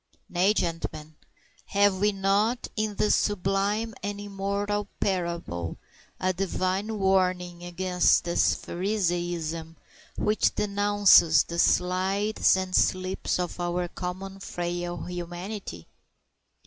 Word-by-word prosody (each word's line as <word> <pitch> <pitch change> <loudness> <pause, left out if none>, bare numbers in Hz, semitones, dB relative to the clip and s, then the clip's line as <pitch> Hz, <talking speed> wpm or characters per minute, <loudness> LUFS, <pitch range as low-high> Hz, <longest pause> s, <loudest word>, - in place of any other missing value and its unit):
Nay, 185 +4 +2
gentlemen, 160 -3 -3 0.5
have 200 -1 +3
we 210 +2 +3
not 200 +5 +1
in 215 -1 -1
this 210 - +2
sublime 205 +3 0
and 205 0 -4
immortal 205 +1 -2
parable 170 - -2 0.4
a 185 0 +1
Divine 190 +3 -1
warning 185 -3 +1
against 180 +1 +2
this 170 0 +2
Phariseeism 175 -4 -2 0.4
which 210 +1 +1
denounces 205 -4 +5
the 170 0 -5
slides 190 +4 +2
and 185 0 -2
slips 185 0 +1
of 180 0 -4
our 175 0 -1
common 190 +2 -6
frail 175 -1 -4
humanity? 175 - -6
185 Hz, 100 wpm, -27 LUFS, 175-205 Hz, 0.5 s, denounces